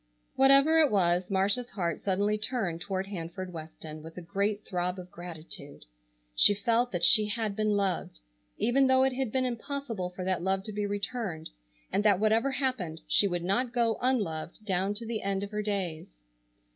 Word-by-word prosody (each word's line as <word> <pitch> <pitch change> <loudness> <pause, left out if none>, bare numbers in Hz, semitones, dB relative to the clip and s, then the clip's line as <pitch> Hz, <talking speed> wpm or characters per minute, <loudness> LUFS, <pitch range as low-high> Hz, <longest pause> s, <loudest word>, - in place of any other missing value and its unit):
Whatever 275 +4 +6
it 310 -3 +5
was, 180 -3 +2
Marcia's 200 +6 +1
heart 170 -5 -2
suddenly 205 +2 +1
turned 210 -6 -1
toward 190 +1 -2
Hanford 185 -1 -6
Weston 155 -1 -8
with 160 +2 -11
a - - -5
great 200 +4 -1
throb 180 0 -2
of 180 0 -9
gratitude. 165 -4 -9 0.5
She 205 - +6
felt 230 +4 +1
that 175 -2 -3
she 215 -1 +6
had 215 -1 -2
been 215 0 0
loved, 185 - -2 0.4
even 265 +3 +3
though 260 0 +4
it 265 0 +2
had 255 -3 -2
been 260 +1 +1
impossible 245 -5 -3
for 180 0 -7
that 185 -2 0
love 190 +1 0
to 215 - -5
be 205 0 -1
returned, 200 -5 -4 0.4
and 205 - +2
that 205 -3 +4
whatever 220 +5 +3
happened 255 - -2
she 200 - +4
would 175 -2 -2
not 235 +7 0
go 230 -2 +1
unloved 210 -7 -1
down 195 +1 0
to 230 +2 -5
the 225 -1 -3
end 195 0 -1
of 200 - -6
her 210 0 -2
days. 195 -6 -3
200 Hz, 185 wpm, -29 LUFS, 180-230 Hz, 0.5 s, Whatever